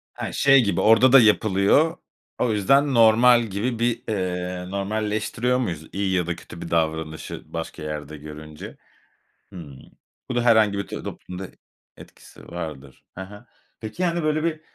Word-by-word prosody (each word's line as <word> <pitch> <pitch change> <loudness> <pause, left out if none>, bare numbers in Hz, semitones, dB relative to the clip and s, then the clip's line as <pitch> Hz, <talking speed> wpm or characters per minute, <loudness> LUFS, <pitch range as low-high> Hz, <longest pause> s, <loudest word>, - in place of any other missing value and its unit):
He, - - -5
şey 135 -2 +5
gibi 100 - 0
orada 115 +4 +5
da 135 - +9
yapılıyor, 110 - +3 0.4
o 120 - +1
yüzden 135 +7 +3
normal 120 +1 +5
gibi 115 +3 -3
bir, 120 0 0
eee, 90 -3 -3
normalleştiriyor 110 +4 -1
muyuz? 85 -11 -4
İyi 95 -1 -1
ya 90 -2 0
da 85 - -2
kötü 85 -1 -12
bir - - -7
davranışı 80 -1 -2
başka 80 -2 -6
yerde 75 0 -6
görünce. 75 +1 -10 0.8
Hıı. 80 -7 -10 0.5
Bu 125 - -2
da 120 - +2
herhangi 110 -4 +4
bir 100 - -3
t - - -7
toplumda 90 +1 -8 0.5
etkisi - - -16
vardır. 75 -6 -8
Hı - - -8
hı. 105 +4 -10 0.3
Peki, 110 +12 -4
hani, 170 -1 0
böyle 155 +1 0
bir 155 -2 -2
100 Hz, 155 wpm, -23 LUFS, 85-120 Hz, 0.8 s, da